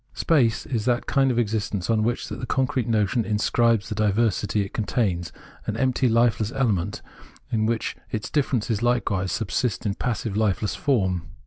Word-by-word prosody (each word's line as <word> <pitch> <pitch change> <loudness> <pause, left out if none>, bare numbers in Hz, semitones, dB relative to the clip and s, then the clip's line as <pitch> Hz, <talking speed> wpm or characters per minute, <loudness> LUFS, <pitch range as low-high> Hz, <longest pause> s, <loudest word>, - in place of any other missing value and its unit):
Space 125 -9 +2
is 115 -4 -2
that 120 -1 +1
kind 135 -1 +2
of 125 - 0
existence 105 -4 -1
on 115 -2 +2
which 120 +2 -1
the - - -7
concrete 130 -2 0
notion 110 +1 +1
inscribes 110 0 +2
the - - -3
diversity 105 0 +1
it 95 - -11
contains 100 -6 -1 0.2
— - - -23
an - - -2
empty, 130 -1 +2
lifeless 115 -1 +2
element 100 -8 0 0.5
in 110 -1 +1
which 115 -1 -1
its 110 - -4
differences 125 -7 0
likewise 100 -6 +1
subsist 115 0 -1
in 100 - +1
passive, 115 -1 -2
hfeless 105 -1 0
form. 95 - 0
110 Hz, 160 wpm, -24 LUFS, 105-120 Hz, 0.5 s, Space